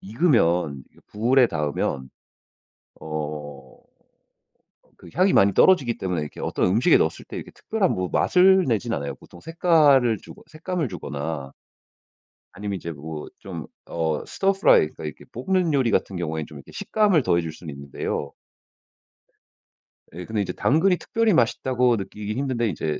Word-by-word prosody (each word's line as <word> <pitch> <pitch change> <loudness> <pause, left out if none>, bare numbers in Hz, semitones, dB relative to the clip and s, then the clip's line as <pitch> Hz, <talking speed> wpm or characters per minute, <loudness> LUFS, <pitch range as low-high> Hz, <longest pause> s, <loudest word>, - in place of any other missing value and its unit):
익으면 90 - +1
이게 - - -23
불에 120 +4 +3
닿으면 75 -5 -2 0.9
어 75 -3 -7 1.2
그 - - -14
향이 185 +2 +3
많이 100 0 +5
떨어지기 135 -11 +4
때문에 90 -4 -2
이렇게 75 - -7
어떤 - - 0
음식에 115 - +4
넣었을 - - -1
때 - - -9
이렇게 - - -7
특별한 210 -5 -1
뭐 95 0 -2
맛을 190 +1 +5
내지는 115 -1 0
않아요. 70 -1 -4
보통 85 +5 -16
색깔을 150 - +3
주고 - - -13
색감을 160 0 -3
주거나 75 -5 -5 1.0
아니면 100 0 -4
이제 85 -1 -6
뭐 75 +1 -7
좀 - - -7 0.2
어 80 -2 -2
stir-fry 195 - +3
그러니까 - - -10
이게 75 - -8
볶는 170 +5 0
요리 130 -5 +2
같은 95 - 0
경우엔 80 -3 -3
좀 - - -12
이렇게 - - -13
식감을 205 -8 +2
더해 85 0 +2
줄 80 -1 -5
수는 80 -2 -9
있는데요. 70 0 -5 1.8
예 90 +1 -7
근데 110 -2 -2
이제 100 - -3
당근이 175 +6 +2
특별히 225 -3 +1
맛있다고 125 -1 +2
느끼기 105 +1 -5
힘든데 125 -3 -1
이제 80 -3 -3
105 Hz, 345 characters per minute, -24 LUFS, -, 1.8 s, 많이